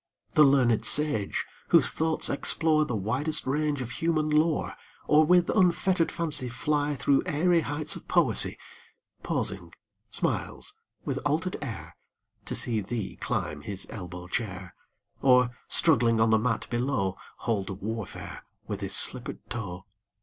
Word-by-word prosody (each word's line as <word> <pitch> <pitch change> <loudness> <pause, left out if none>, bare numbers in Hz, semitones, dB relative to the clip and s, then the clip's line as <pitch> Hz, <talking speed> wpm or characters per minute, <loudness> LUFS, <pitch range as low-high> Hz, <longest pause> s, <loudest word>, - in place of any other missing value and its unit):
The - - +4
learned 130 -5 +3
sage, 145 -9 +1 0.2
whose - - +6
thoughts 160 0 0
explore 155 +2 +2
The 120 - -4
widest 125 +10 -1
range 145 +1 -1
of 120 - -8
human 155 +1 -1
lore, 155 +1 +1 0.3
Or 150 +1 +4
with 175 +2 +3
unfettered 185 -2 +1
fancy 150 -7 0
fly 145 +4 -1
Through 140 +1 +1
airy 170 +3 +2
heights 150 0 -2
of - - -11
poesy, - - +5 0.6
Pausing - - -3 0.4
smiles - - -3 0.3
with - - -2
altered 160 +5 -1
air 115 -9 -7 0.5
To - - -4
see 115 -3 0
thee 105 +1 -5
climb 75 -1 -4
his 95 +5 -3
elbow 90 -3 -8
chair, 95 -4 -5 0.5
Or, 125 -2 +4 0.2
struggling 120 -8 +5
on 110 0 +3
the 110 - +4
mat 110 0 -1
below, 120 -6 -1 0.2
Hold 105 -4 -3
warfare 110 0 -6 0.2
with - - -5
his - - 0
slippered - - +3
toe. 95 -6 -6
130 Hz, 135 wpm, -27 LUFS, 110-155 Hz, 0.6 s, whose